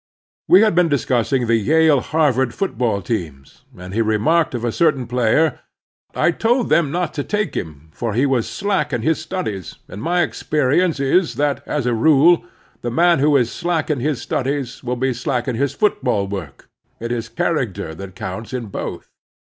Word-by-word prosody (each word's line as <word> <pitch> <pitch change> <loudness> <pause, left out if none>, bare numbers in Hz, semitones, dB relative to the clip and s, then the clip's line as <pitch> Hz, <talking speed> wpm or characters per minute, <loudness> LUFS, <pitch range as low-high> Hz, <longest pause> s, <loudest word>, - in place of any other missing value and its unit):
We 185 - +7
had 220 -3 +4
been 175 -1 +3
discussing 130 -2 +1
the 115 0 +3
Yale 155 +5 +3
Harvard 130 -6 +1
football 120 - -1
teams, 80 - -5
and 90 +1 -9
he 115 - +1
remarked 115 +9 +1
of 120 0 -3
a 120 - 0
certain 135 -2 +1
player: 125 +5 +1 0.6
"I - - +3
told 235 +7 +1
them 165 -4 +3
not 175 +1 -2
to 145 - -3
take 210 +4 -2
him« 80 -1 -6
for 115 -3 -3
he 130 +4 +3
was 130 -5 0
slack 200 -7 -1
in 120 -2 -1
his 160 +3 +1
studies, 110 - -5
and 100 - -9
my 175 +2 +1
experience 155 +2 0
is 155 +6 +2
that, 145 -1 0
as 150 -4 -2
a 125 - +1
rule, 155 +7 +4 0.4
the 120 - -3
man 170 +5 +3
who 145 +1 +4
is 120 -3 +1
slack 170 -3 -1
in 145 - -1
his 140 0 -1
studies 135 -1 -3
will 125 0 -2
be 130 +1 0
slack 120 0 -2
in 130 - 0
his 140 +3 -1
football 205 - 0
work; 95 -8 -7 0.3
it 115 +1 -4
is 115 -1 -3
character 120 - -2
that 95 +2 -9
counts 110 +7 -6
in 120 -4 -4
both." - - -6
130 Hz, 185 wpm, -20 LUFS, 115-160 Hz, 0.6 s, We